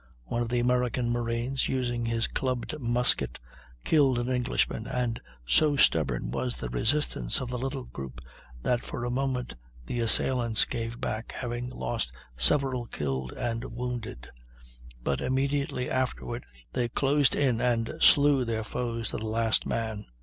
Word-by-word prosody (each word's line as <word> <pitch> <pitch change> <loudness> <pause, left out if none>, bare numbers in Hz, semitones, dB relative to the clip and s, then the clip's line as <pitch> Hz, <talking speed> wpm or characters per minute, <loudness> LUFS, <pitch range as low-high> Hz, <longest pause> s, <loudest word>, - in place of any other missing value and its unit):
One 120 - -2
of 120 - -2
the 120 0 +1
American 125 0 +1
marines, 120 +2 -1
using 120 -2 -1
his 115 0 +2
clubbed 130 +4 -2
musket, 120 -1 +3 0.4
killed 140 - +4
an 120 +1 -1
Englishman, 125 -2 0
and 125 -2 -1 0.3
so 145 - +3
stubborn 65 - +2
was 65 -2 -2
the - - -4
resistance 65 - +1
of 130 - -4
the 125 -1 -3
little 135 +1 -3
group 65 - -8 0.4
that 125 -1 +1
for 120 - -5
a 120 - -2
moment 130 -1 -1 0.3
the 120 - -3
assailants 115 0 +4
gave 115 0 -4
back, 110 +1 -4
having 120 0 -4
lost 115 - -3 0.2
several 130 - +3
killed 65 - -3
and 115 0 -3
wounded; 115 - -5 0.8
but 70 +1 0
immediately 135 -1 0
afterward 125 -2 -2 0.3
they 120 -2 0
closed 140 +2 +3
in 125 -5 +2
and 115 -2 +1
slew 140 -2 +6
their 115 -2 -2
foes 115 +1 -3
to - - -3
the 110 - -4
last 115 0 +1
man. 110 -2 -3
120 Hz, 150 wpm, -28 LUFS, 115-130 Hz, 0.8 s, slew